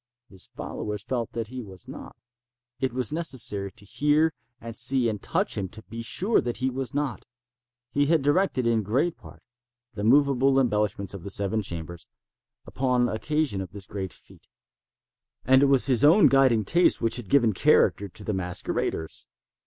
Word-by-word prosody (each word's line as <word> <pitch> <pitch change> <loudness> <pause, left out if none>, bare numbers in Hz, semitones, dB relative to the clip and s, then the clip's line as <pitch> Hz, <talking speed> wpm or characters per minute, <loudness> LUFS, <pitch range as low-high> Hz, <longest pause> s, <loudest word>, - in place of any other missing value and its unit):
His 95 -2 -6
followers 105 -1 -5
felt 120 -3 -3
that 115 -2 -4
he 130 0 -6
was 95 -5 -12
not. - - -10 0.6
It 130 -2 -1
was 125 +1 -2
necessary 115 - +1
to 100 - -12
hear 150 +7 +1 0.3
and 115 -1 -8
see 125 0 +3
and 105 -3 -3
touch - - -1
him 95 -2 -4
to 110 +3 -9
be 115 0 -8
sure 190 - +1
that 120 -1 -3
he 130 0 -1
was 130 0 -4
not. 145 -3 -2 0.7
He 145 0 +1
had 160 -2 +2
directed, 145 -3 +1
in 115 -1 +2
great 135 - 0
part, - - -16 0.5
the 100 -2 -5
moveable 135 +2 +4
embellishments 105 -6 -1
of 100 - -8
the 100 - -7
seven 100 +2 0
chambers, 85 -2 -7 0.6
upon 125 -2 0
occasion 140 -2 -1
of 95 0 -8
this 100 -2 -6
great 95 -1 -5
fête; - - -17 1.0
and 130 +1 +5
it 140 - +5
was 135 -2 +3
his 130 -2 +2
own 165 +8 +6
guiding 130 -6 +3
taste 175 +1 +3
which 115 +1 +1
had 115 -6 -7
given 120 -6 +3
character 100 +2 +3
to 105 - -9
the 105 - -2
masqueraders. 90 -3 -3
120 Hz, 175 wpm, -26 LUFS, 100-135 Hz, 1.0 s, own